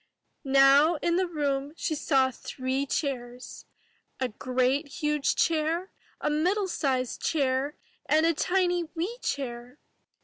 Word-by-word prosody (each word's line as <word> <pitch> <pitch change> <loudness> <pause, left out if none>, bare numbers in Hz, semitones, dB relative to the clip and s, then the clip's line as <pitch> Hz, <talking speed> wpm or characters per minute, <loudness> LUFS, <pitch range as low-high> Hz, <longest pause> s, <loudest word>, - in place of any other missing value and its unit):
Now 275 +4 +5
in 340 +2 0
the 370 0 +1
room 285 -3 -2
she - - -1
saw 270 -3 +2
three 260 +2 -3
chairs, 250 -4 -4 0.3
— - - -43
a 255 -1 0
great 255 +5 0
huge 300 0 -1
chair, 330 +3 0 0.3
a - - -2
middle 370 +7 +1
sized 260 -7 -1
chair, 275 -1 0 0.3
and 315 +1 +3
a 335 - +3
tiny 355 +1 +1
wee 390 +9 -3
chair. 245 -1 -4
285 Hz, 130 wpm, -27 LUFS, 260-330 Hz, 0.3 s, Now